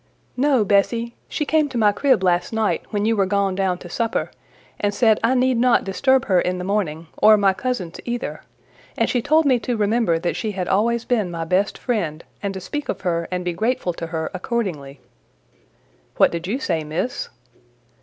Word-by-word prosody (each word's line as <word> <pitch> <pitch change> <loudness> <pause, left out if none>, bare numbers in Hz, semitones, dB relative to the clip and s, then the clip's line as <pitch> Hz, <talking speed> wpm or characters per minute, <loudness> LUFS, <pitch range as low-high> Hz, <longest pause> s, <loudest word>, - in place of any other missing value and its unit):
"No, 260 -4 +2
Bessie: 230 +4 +1 0.2
she 300 - -2
came 305 -1 +2
to 250 - -4
my 210 -2 +4
crib 260 -2 +2
last 175 -1 +1
night 220 -2 0
when 205 0 -1
you 225 +1 +2
were 195 -2 +2
gone 200 0 +1
down 185 -1 0
to 175 - -11
supper, 230 +6 -2 0.5
and 205 0 0
said 220 -3 +4
I 240 +3 +3
need 255 -1 +2
not 250 0 +4
disturb 260 +6 +2
her 185 -3 +3
in 180 0 -1
the 180 - -4
morning, 180 -5 -2
or 215 0 +7
my 200 -2 +3
cousins 190 -5 -4
either; 240 0 -4 0.6
and - - +2
she 245 - 0
told 310 +4 +3
me 255 -3 +3
to 235 +2 -2
remember 215 -4 +2
that 170 +1 -2
she 215 -2 -3
had 185 -2 -3
always 235 +4 +1
been 220 -7 0
my 165 -1 -4
best 185 +4 +1
friend, 170 - -2 0.2
and 200 - -2
to - - -4
speak 295 +10 -5
of - - -3
her 170 -2 -1
and 180 -1 -3
be 175 - -1
grateful 215 -1 -1
to 165 0 -6
her 160 -1 -3
accordingly." 180 - -4 1.2
"What - - +5
did 170 +1 -4
you 220 +7 -1
say, 170 - -1
Miss?" 185 - -3
205 Hz, 200 wpm, -21 LUFS, 180-240 Hz, 1.2 s, or